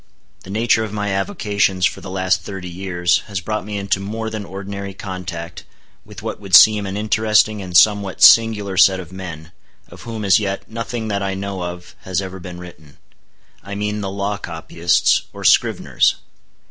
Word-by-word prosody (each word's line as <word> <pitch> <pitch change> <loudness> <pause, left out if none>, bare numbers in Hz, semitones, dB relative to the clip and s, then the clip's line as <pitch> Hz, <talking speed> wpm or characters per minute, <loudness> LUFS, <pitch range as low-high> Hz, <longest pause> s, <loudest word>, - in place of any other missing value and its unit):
The - - -13
nature 110 +2 +2
of 110 - -5
my 105 -1 -3
avocations 100 - 0
for - - -1
the 100 - -8
last 95 -1 0
thirty 95 -2 -7
years 90 -1 0
has 100 -3 -3
brought 105 +4 -3
me 105 +1 -5
into 100 -1 -1
more 110 +3 -5
than 110 -2 -5
ordinary 100 0 -7
contact 90 -3 -7 0.4
with - - -12
what - - -5
would 95 -3 +2
seem 105 -1 +7
an 95 +1 -4
interesting 110 0 +2
and 90 -2 +1
somewhat 100 +1 +3
singular 105 -4 +5
set 95 -1 +5
of 90 -2 -9
men, 85 -4 -8 0.4
of - - -13
whom 110 -3 -6
as 95 -4 +5
yet 95 -1 -4
nothing 115 0 -5
that 100 -1 -1
I 95 0 -2
know 100 -1 -5
of 90 0 -7
has 95 -1 -2
ever 95 -1 -6
been 90 0 -9
written:—I 90 +3 -14
mean 105 +1 -2
the 100 - -3
law 100 +1 -3
copyists 85 0 +1
or - - -9
scriveners. - - +3
100 Hz, 175 wpm, -19 LUFS, 90-105 Hz, 0.4 s, seem